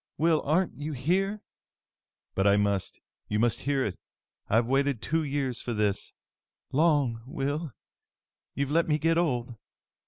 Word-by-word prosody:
Will, 160 0 +3
aren't 165 +2 0
you 150 +1 -3
here?" 195 +10 0 0.9
"But 95 +1 +2
I 100 0 +5
must! 100 -2 0 0.3
You 105 - 0
must 115 +1 +2
hear 140 -2 +1
me! 95 - -3 0.5
I've 115 +2 +3
waited 135 0 +1
two 160 +8 0
years 135 -5 -2
for 120 - -3
this!" 105 -2 -1 0.6
"Long, 145 -6 +2
Will! 145 +3 -2 0.8
You've 140 0 -1
let 165 +2 +3
me 150 -1 +2
get 165 +2 +2
old!" 125 -8 0
140 Hz, 145 wpm, -28 LUFS, 120-155 Hz, 0.9 s, I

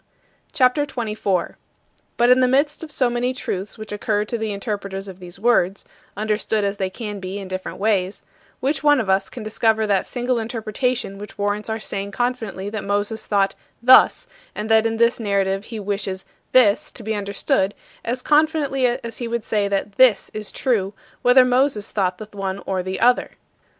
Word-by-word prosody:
CHAPTER 265 -1 +3
XXIV - - -15 0.2
33. 190 -5 -1 0.6
But 240 +1 +5
in 250 - +6
the 255 - +4
midst 285 +5 +1
of 320 - -7
so 260 -4 +2
many 245 +1 -1
truths 195 -4 -4
which 215 -1 -8
occur 210 0 0
to 235 - -3
the 220 -2 -2
interpreters 200 -1 -4
of 190 -1 -10
these 175 -1 -10
words 200 -3 +2 0.3
(understood 215 0 0
as 200 0 -1
they 190 -2 -1
can 210 0 -6
be 190 +1 -5
in 195 -2 -6
different 185 0 -5
ways), 195 -2 0 0.4
which 275 +2 0
one 290 -1 +5
of 205 -5 0
us 195 0 +1
can 240 - -8
discover 220 0 +1
that 200 -2 +1
single 245 -1 -1
interpretation 225 -1 -2
which 210 - -10
warrants 205 +1 -1
our 220 - -1
saying 200 -2 -4
confidently 225 -6 -2
that 210 0 -4
Moses 205 +2 -2
thought 200 -2 +2 0.3
thus 255 - +6 0.3
and 215 +1 -3
that 220 0 +5
in 225 0 -2
this 235 +1 +3
narrative 200 -2 0
he 225 -2 -6
wishes 195 -2 -3 0.3
this 220 -6 +4
to 235 - -9
be 220 +1 -2
understood, 200 -1 0 0.3
as 250 +2 -3
confidently 295 -4 +2
as 235 -1 -4
he 240 - -3
would 230 -1 -3
say 205 -2 +1
that 200 0 -2
this 250 -6 +4
is 215 -1 -5
true, 205 -7 0 0.3
whether 255 +1 +6
Moses 250 -4 +1
thought 185 -3 0
the 215 - -8
one 195 -1 -3
or 190 -1 -1
the 185 +1 -4
other. 245 0 +3
215 Hz, 185 wpm, -22 LUFS, 200-245 Hz, 0.6 s, in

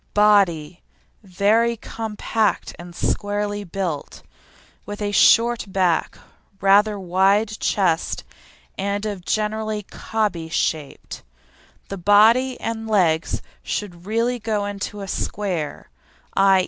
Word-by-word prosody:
BODY 190 -6 +3 0.4
Very 215 +4 +2
compact 220 -1 -2
and 175 0 -10
squarely 205 +1 -1
built, 180 -5 -5 0.6
with 205 0 -7
a 205 -1 -2
short 235 +3 +4
back, 185 -3 0 0.4
rather 205 +2 +4
wide 195 +4 +2
chest, 175 -5 0 0.6
and 200 +2 -2
of 200 -4 -4
generally 215 +1 -1
"cobby" 195 -6 -3
shape. 155 -3 -2 0.8
The 195 - -5
body 225 +7 +4
and 225 0 -4
legs 175 -6 +1 0.2
should 180 -3 -5
really 230 +3 0
go 215 -2 -1
into 205 0 -5
a 195 - -6
square, 185 -6 -3 0.4
_i. 195 -1 +5
205 Hz, 105 wpm, -22 LUFS, 185-215 Hz, 0.8 s, i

